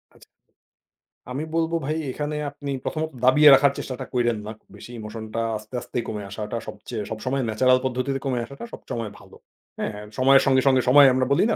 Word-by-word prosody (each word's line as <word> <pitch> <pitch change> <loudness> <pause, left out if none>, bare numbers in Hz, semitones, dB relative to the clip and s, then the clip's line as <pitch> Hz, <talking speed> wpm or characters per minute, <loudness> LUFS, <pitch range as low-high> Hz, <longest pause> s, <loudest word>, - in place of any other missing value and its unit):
আচ্ছা। - - -19 1.1
আমি 140 +4 -3
বলব 165 0 +1
ভাই 155 +2 -1
এখানে 150 +2 -4
আপনি 145 0 -7
প্রথমত 160 -1 -2 0.2
দাবিয়ে 150 +3 +7
রাখার 140 +1 +6
চেষ্টাটা 130 0 -5
কইরেন 120 -3 +1
না। - - -4 0.2
বেশি 120 - -11
ইমোশনটা 110 +1 -5 0.2
আস্তে, 105 +3 -15
আস্তে - - -7
কমে 105 -2 -4
আসাটা 110 +2 -5
সবচেয়ে 105 0 -6
সবসময় 130 +5 -2
ন্যাচারাল 130 +4 +3
পদ্ধতিতে 130 +2 -1
কমে 130 -3 0
আসাটা 140 - -11
সবসময় 115 -2 -5
ভালো। 100 -1 -16 0.4
হ্যাঁ? 110 - -2 0.2
সময়ের 135 +1 +6
সঙ্গে, 130 -1 +4
সঙ্গে 130 -1 +5
সময় 140 +1 +8
আমরা 130 0 +1
বলি 140 - +4
না, - - +2
130 Hz, 175 wpm, -24 LUFS, 115-140 Hz, 1.1 s, সময়